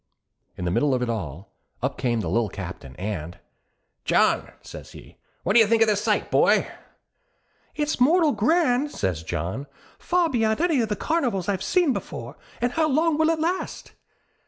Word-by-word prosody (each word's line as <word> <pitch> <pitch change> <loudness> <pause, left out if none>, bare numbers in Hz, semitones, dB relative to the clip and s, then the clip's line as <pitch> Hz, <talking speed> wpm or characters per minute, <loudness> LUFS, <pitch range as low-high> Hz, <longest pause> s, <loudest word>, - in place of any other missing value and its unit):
In 90 - -4
the 85 - 0
middle 140 +7 +2
of 125 - -1
it 120 - -1
all, 90 -4 -6 0.3
up - - -1
came 120 -3 0
the - - -4
Lil 115 -2 +1
Captain 90 -10 -8
and 90 -3 -5 0.7
'John,' - - +2
says - - -11
he. - - -14 0.3
'What 195 - +1
do 235 - +7
you 220 - +6
think 225 +1 +4
of - - +1
this 210 -1 +1
sight, - - 0
boy?' - - +4 1.1
'It's 300 -2 -1
mortal 315 +4 +4
grand,' 295 -4 +2
says 90 - -2
John. 85 - -4 0.3
'Far 355 -1 +1
before 225 -3 +1
any 320 -7 +2
of 220 - -1
the 210 - 0
carnivals 240 - -1
I've 195 -3 -1
seen 350 - +2
before; - - -6 0.3
an' 245 0 +1
how 315 +4 +1
long 310 +2 +2
will 315 0 +4
it 325 -1 +1
last?' 345 +4 -3
220 Hz, 180 wpm, -24 LUFS, -, 1.1 s, do